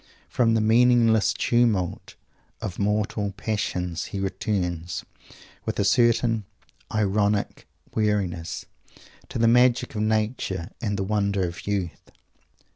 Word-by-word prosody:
From 115 -2 +2
the 110 - +2
meaningless 115 -1 +4
tumult 115 -7 0 0.4
of 100 -5 -5
mortal 105 0 0
passions 90 -5 -2
he 100 - -5
returns, 90 -3 -2 0.6
with - - -3
a - - +2
certain 115 0 +3 0.5
ironic 105 -1 0 0.3
weariness, 95 -6 -1 0.6
to - - -4
the 115 0 +3
magic 125 +1 +4
of 105 - -2
Nature 110 -5 -1
and 105 -4 -1
the 95 - -1
wonder 100 -1 0
of 85 +3 -8
youth. 95 -4 -3
105 Hz, 115 wpm, -25 LUFS, 95-115 Hz, 0.6 s, meaningless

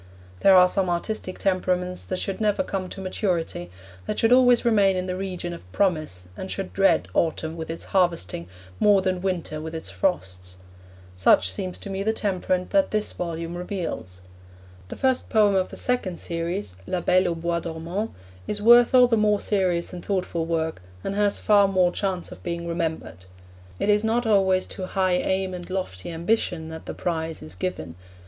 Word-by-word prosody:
There 195 - +6
are 180 0 +8
some 185 0 0
artistic 185 +2 -3
temperaments 180 -1 0
that 185 - -3
should 195 +3 -3
never 215 +5 +2
come 190 -7 -4
to - - -8
maturity, 180 - -2 0.4
that - - -2
should 225 - +3
always 245 -2 +5
remain 200 -5 +4
in 185 0 -2
the 180 0 -3
region 185 -2 -4
of 90 - -12
promise 155 - 0
and 190 - -6
should 195 -1 -4
dread 195 0 +3
autumn 160 0 0
with 160 -1 -6
its 165 - -5
harvesting 170 - +1 0.3
more 200 -2 +5
than 185 -1 0
winter 175 -5 -2
with 160 +1 -6
its 160 - -6
frosts. 90 - -2 0.6
Such 90 0 +4
seems 180 - -4
to 200 - -7
me 195 0 -3
the 220 +2 +1
temperament 185 -3 -1
that 295 -1 +3
this 215 0 0
volume 170 -1 -4
reveals. 175 - -5 0.7
The - - -7
first 260 -1 0
poem 210 -2 +4
of 190 -1 +1
the - - -8
second 225 -8 -1
series, 170 - -4
La 185 - -1
Belle 185 +2 +3
au 170 - -1
Bois 170 +1 -1
Dormant, 170 +6 -4 0.4
is 210 - -2
worth 240 +3 +6
all 250 -1 +8
the 235 -2 +2
more 210 -1 +3
serious 185 -4 0
and 175 - -7
thoughtful 180 -4 -2
work, 160 - -1 0.2
and 195 - -2
has 205 0 +1
far 205 -2 +4
more 185 -2 +3
chance 185 -2 -3
of - - -11
being 170 -1 -4
remembered. 160 - -4 0.5
It - - 0
is 210 0 +3
not 230 +2 +1
always 190 -3 +3
to 185 -2 -5
high 185 -2 +1
aim 190 +1 -1
and 175 0 -7
lofty 185 - -4
ambition 170 -1 -1
that 160 0 -9
the - - -5
prize 165 -2 -3
is 80 +2 -9
given. 90 -3 -4
185 Hz, 185 wpm, -24 LUFS, 165-200 Hz, 0.7 s, are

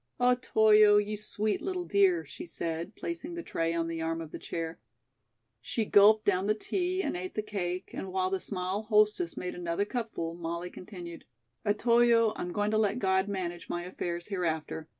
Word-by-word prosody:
"Otoyo, 220 -4 +5
you 210 +1 0
sweet, 210 0 -2
little 365 -2 -3
dear," 380 -4 +3
she 345 - -9
said, 170 - -4
placing 340 0 -5
the 340 - -5
tray 165 - -1
on 165 0 0
the 165 -1 -4
arm 165 0 -1
of 160 -2 -7
the - - -7
chair. 165 -1 -5 0.8
She 225 - -2
gulped 210 +2 +6
down 190 0 +2
the 215 - +3
tea 365 - -1
and - - -2
ate 185 +1 -5
the 215 - -1
cake, 185 -3 -4
and 190 - -5
while 185 0 0
the 190 - 0
small 185 +1 -3
hostess 215 +9 +2
made 180 - -4
another 175 +3 -1
cupful, 220 -8 -3
Molly 170 +1 -5
continued: 175 -3 -9 0.4
"Otoyo, 230 +1 +4
I'm 175 - -4
going 205 +3 0
to 215 - +2
let 210 +1 +1
God 190 -3 +2
manage 175 -3 -4
my 175 0 -2
affairs 175 -1 -4
hereafter. 160 -4 -2
200 Hz, 180 wpm, -30 LUFS, 175-220 Hz, 0.8 s, gulped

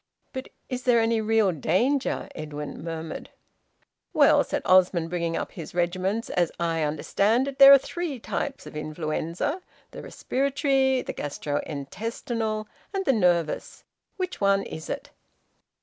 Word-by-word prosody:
"But 260 -1 -5 0.2
is 255 -1 -4
there 245 -2 +4
any 225 0 +2
real 220 -2 +3
danger?" 240 - 0
Edwin 150 0 -6
murmured. 165 -1 -6 0.8
"Well," - - +5
said - - -3
Osmond, 180 -2 +4
bringing 170 -2 -1
up - - -4
his 170 -3 -9
regiments, 185 +5 -1
"as 175 -2 +1
I 165 -1 0
understand 200 - +1
it, 275 -1 -6
there 275 0 +11
are 280 - +11
three 320 +1 -4
types 275 +4 -4
of - - -10
influenza 155 - -3 0.3
the - - -8
respiratory, 270 -1 +1
the - - -5
gastro 145 0 -3
intestinal, 215 - -3 0.3
and 385 0 -1
the 270 - +4
nervous. 175 -7 0 0.3
Which 365 - -4
one 200 0 +3
is 160 - -8
it?" - - -5
200 Hz, 140 wpm, -26 LUFS, 165-260 Hz, 0.8 s, there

